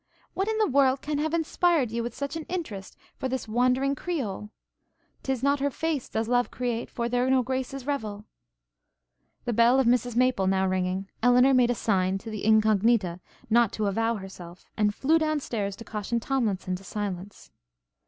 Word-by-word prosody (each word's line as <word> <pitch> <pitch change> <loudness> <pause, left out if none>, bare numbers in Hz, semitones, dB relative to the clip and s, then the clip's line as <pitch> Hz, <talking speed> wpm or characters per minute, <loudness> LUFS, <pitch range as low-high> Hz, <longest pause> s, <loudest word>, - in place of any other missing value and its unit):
What 385 +2 -1
in 440 0 0
the 435 - +3
world 270 -3 +2
can 295 -1 -2
have 310 +1 0
inspired 330 -5 +1
you 235 +1 -2
with 235 0 -5
such 280 +2 -4
an 320 -2 -5
interest 230 - -5 0.2
for 260 - -3
this 255 -2 -3
wandering 250 +4 +2
Creole? 255 - -4 0.7
''Tis 265 -2 -2
not 280 0 +2
her 285 +1 +1
face 310 -1 -2
does 220 0 -2
love 245 0 +2
create, 240 -2 -3
For 235 -1 -3
there 245 +1 +1
no 260 -1 +3
graces 260 +1 -4
revel.' 215 -8 -3 1.2
The 240 - -1
bell 235 +4 +5
of 265 - +3
Mrs 245 0 +2
Maple 250 -6 +2
now 190 0 +2
ringing, 185 +1 -1
Elinor 250 +3 +5
made 250 -2 +4
a 245 - +1
sign 190 -4 +1
to 220 +3 -8
the 215 -2 -5
Incognita 215 -3 +3 0.3
not 235 -1 +3
to 215 - -1
avow 225 +3 0
herself, 185 -3 -10
and 210 -1 +1
flew 315 +4 +3
down 310 -1 0
stairs 205 -7 -3
to 230 - -10
caution 220 +1 -3
Tomlinson 215 -8 -1
to 190 - -15
silence. 200 -1 -6
240 Hz, 185 wpm, -27 LUFS, 210-270 Hz, 1.2 s, bell